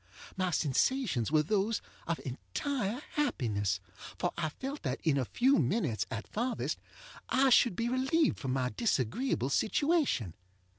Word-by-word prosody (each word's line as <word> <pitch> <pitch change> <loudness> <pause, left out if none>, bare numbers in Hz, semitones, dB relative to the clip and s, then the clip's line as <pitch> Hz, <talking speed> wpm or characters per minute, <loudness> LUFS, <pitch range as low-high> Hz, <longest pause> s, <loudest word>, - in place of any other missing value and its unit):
My 185 -1 0
sensations 155 - +1
were 155 -1 +4
those 210 +6 +1 0.3
of 165 -1 -1
entire 200 - -3
happiness, 105 - 0 0.4
for - - -1
I 160 -2 -1
felt 270 - -6
that 130 -3 -2
in 155 -4 +3
a 130 - 0
few 260 - +3
minutes, 150 - 0
at 115 -1 -4
farthest, 240 +3 -2 0.5
I 265 0 +4
should 235 -5 +5
be 230 - -1
relieved 270 +6 +2
from 130 -2 -2
my 130 -1 0
disagreeable 140 - 0
situation. 275 - +1
185 Hz, 140 wpm, -31 LUFS, -, 0.5 s, should